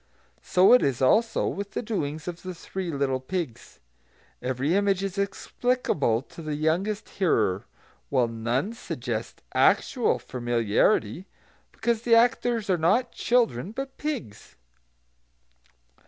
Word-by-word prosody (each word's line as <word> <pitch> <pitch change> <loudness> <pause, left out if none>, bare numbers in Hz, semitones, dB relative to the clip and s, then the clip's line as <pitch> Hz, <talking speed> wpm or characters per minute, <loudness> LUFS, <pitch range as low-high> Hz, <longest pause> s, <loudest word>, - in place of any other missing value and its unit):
So 185 +5 +5
it 250 - +7
is, 135 -3 0
also, 220 - +3
with 200 0 -4
the - - -2
doings 155 -8 -3
of 175 -1 -5
the 185 -1 -6
three 185 +1 -5
little 135 -3 0
pigs. 130 -4 -5 0.6
Every 130 +5 -1
image 195 -1 +2
is 195 0 -3
explicable 200 - 0
to 165 - -12
the 155 -2 -3
youngest 180 +8 -1
hearer, 100 - +1 0.4
while 125 -2 +2
none 120 - -2
suggests 120 - -5
actual - - +3
familiarity, 120 - 0 0.4
because 230 0 -1
the 235 -1 +4
actors 235 -2 +2
are 185 -3 +1
not 220 +10 +2
children, 220 - +1
but 270 +2 -6
pigs. 240 - -5
175 Hz, 125 wpm, -26 LUFS, 130-215 Hz, 0.6 s, it